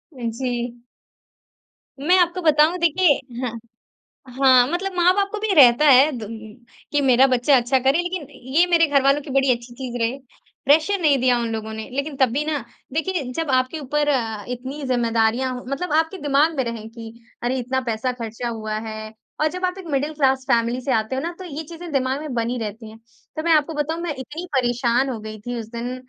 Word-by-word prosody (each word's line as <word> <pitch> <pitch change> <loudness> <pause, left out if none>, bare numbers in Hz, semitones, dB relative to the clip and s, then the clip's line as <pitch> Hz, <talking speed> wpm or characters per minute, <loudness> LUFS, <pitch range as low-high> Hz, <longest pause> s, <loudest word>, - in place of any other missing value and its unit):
जी। 240 0 -3 1.2
मैं 355 +7 +3
आपको 355 +1 +1
बताऊँ, 310 +1 +4
देखिए 340 -2 +4 0.3
हाँ। 250 -3 -2 0.9
हाँ, 255 -2 +6
मतलब 365 +5 -2
माँ-बाप 365 +3 +3
को 430 - -3
भी 430 -2 0
रहता 265 0 +7
है 275 +3 +7
द 215 - -6 0.6
कि 290 -1 +2
मेरा 265 0 +5
बच्चा 255 +2 +3
अच्छा 250 +2 +1
करे, 270 +4 +2
लेकिन 350 -4 -4 0.3
ये 345 +3 +6
मेरे 335 -2 +4
घरवालों 275 0 +3
की 285 - -11
बड़ी 270 -1 +3
अच्छी 240 0 -12
चीज़ 245 -1 -6
रहे। 235 +4 0 0.5
प्रेशर 315 +8 +3
नहीं 290 -4 +4
दिया 250 -1 +3
उन 235 -1 -2
लोगों 220 0 -4
ने, 220 0 -7
लेकिन 280 +2 -3
तब 260 -3 +3
भी 280 +6 -1
ना 310 -1 -1 0.4
देखिए 325 0 -1
जब 320 -1 -2
आपके 255 +5 +1
ऊपर 295 +1 -1
अ, 225 -7 -1
इतनी 260 +4 -6
ज़िम्मेदारियाँ 235 +1 +1
मतलब 295 +5 -3
आपके 325 +4 0
दिमाग 290 +3 +2
में 265 - +1
रहें 230 -2 -6
कि 225 -1 -10 0.3
अरे 250 +2 0
इतना 260 +2 -1
पैसा 235 +1 -2
खर्चा 235 0 -5
हुआ 220 -2 -5
है 215 0 -7 0.3
और 310 - +3
जब 365 0 -2
आप 365 +1 -3
एक 380 - -9
मिडल 285 +3 -1
क्लास 265 -3 +1
फैमिली 235 0 +2
से 270 - -2
आते 220 +2 0
हो 265 - -2
ना 335 +3 -3
तो - - -7
ये 315 -1 -6
चीज़ें 335 +2 -9
दिमाग 265 -1 0
में 300 -3 -6
बनी 235 +1 -1
रहती 220 +1 -6
है। 220 - -13 0.4
तो 310 - -3
मैं 335 - +1
आपको 310 +1 +2
बताऊँ 300 +2 -2
मैं 340 -3 -2
इतनी 305 +7 -7
परेशान 245 +1 +1
हो 235 - -4
गई 215 0 -8
थी 245 +3 -5
उस 220 - -7
दिन 245 +2 -4
265 Hz, 200 wpm, -22 LUFS, 240-310 Hz, 1.2 s, रहता